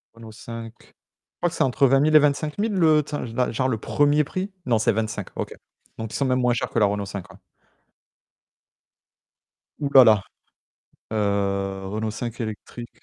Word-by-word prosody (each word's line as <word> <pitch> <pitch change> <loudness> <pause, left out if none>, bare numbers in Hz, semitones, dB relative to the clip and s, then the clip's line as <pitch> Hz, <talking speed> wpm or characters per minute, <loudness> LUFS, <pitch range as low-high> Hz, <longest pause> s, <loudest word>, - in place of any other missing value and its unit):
Renault 115 -1 -11
5? 115 0 -8
Je - - -21 0.5
crois 175 - +2
que - - -9
c'est - - +2
entre 135 +1 +3
20000 140 +4 +3
et - - +10
25000 150 +9 0
le, 160 -5 +4
tu 150 - -6
sais - - -3
là, 125 +2 0
genre 130 +3 0
le 115 - 0
1er 145 +6 +2
prix? 185 +7 -4
Non, 120 -3 +2
c'est 110 - +3
25, 110 -2 -3
OK. - - -4 0.4
Donc 110 -1 -6
ils - - -4
sont 140 - 0
même 130 -1 +1
moins 125 -1 +2
chers 120 - -2
que - - 0
la 105 - +5
Renault 100 0 -1
5 100 -1 -7
ouais. - - -17 2.4
Ouh 140 - -1
là 130 -2 +10
là! 110 -3 +5 0.9
Heu 100 -2 -1
Renault 110 +2 -3
5 115 +1 -6
électrique. 115 +2 -7
115 Hz, 185 wpm, -23 LUFS, 110-145 Hz, 2.4 s, et